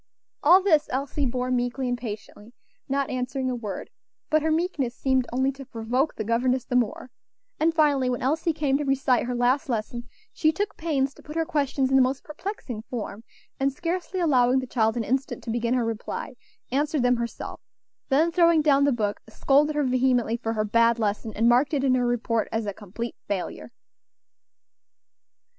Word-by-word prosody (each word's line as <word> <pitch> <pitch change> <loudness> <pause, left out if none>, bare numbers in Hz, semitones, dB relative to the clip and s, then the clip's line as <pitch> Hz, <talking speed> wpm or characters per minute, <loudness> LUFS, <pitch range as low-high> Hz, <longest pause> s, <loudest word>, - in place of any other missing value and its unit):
All 360 +5 +6
this 315 -6 +3
Elsie 275 +2 -1
bore 250 +1 -2
meekly 245 +1 -1
and 245 - 0
patiently, 220 -1 -8 0.3
not 275 0 0
answering 255 +1 -2
a - - -2
word; 215 -5 -6 0.4
but 310 0 +4
her 320 - 0
meekness 310 -7 0
seemed 260 -2 +1
only 260 +2 +1
to 275 0 -10
provoke 250 +3 -1
the 215 - -3
governess 245 +3 +1
the 250 - -3
more; 250 +1 0 0.5
and 320 +2 +3
finally, 290 -5 +2
when 245 -1 -2
Elsie 315 +5 +1
came 290 -3 0
to - - -1
recite 270 -3 +1
her 250 - -2
last 250 +4 +1
lesson, 235 +1 -3 0.2
she 310 - +2
took 410 +5 -3
pains 280 -4 -1
to - - -17
put 300 - -10
her 325 0 +1
questions 280 -4 0
in 270 - +5
the - - +6
most 260 +1 0
perplexing 300 - -6
form, 225 -3 -5 0.4
and 275 +1 +2
scarcely 355 +4 -3
allowing 260 -6 +3
the 260 - 0
child 225 -2 +1
an 235 - 0
instant 260 +5 -2
to 230 - -4
begin 235 +1 0
her 245 -2 +1
reply, 225 +4 -4 0.4
answered 290 +1 +1
them 245 0 +3
herself; 235 0 -5 0.5
then, 310 +5 +3
throwing 335 -2 +4
down 280 -2 +4
the 285 - +3
book, 210 -4 -1
scolded 290 +6 +2
her 295 - +2
vehemently 250 -3 +2
for 225 -1 -3
her 215 -1 0
bad 230 +2 +3
lesson, 215 0 -1
and 225 +2 +2
marked 255 +5 +3
it 275 - 0
in 265 -2 +3
her 250 -1 +2
report 230 -2 0
as 225 0 -1
a 205 - -3
complete 215 +4 -6
failure. 200 +3 -4
255 Hz, 190 wpm, -25 LUFS, 235-290 Hz, 0.5 s, All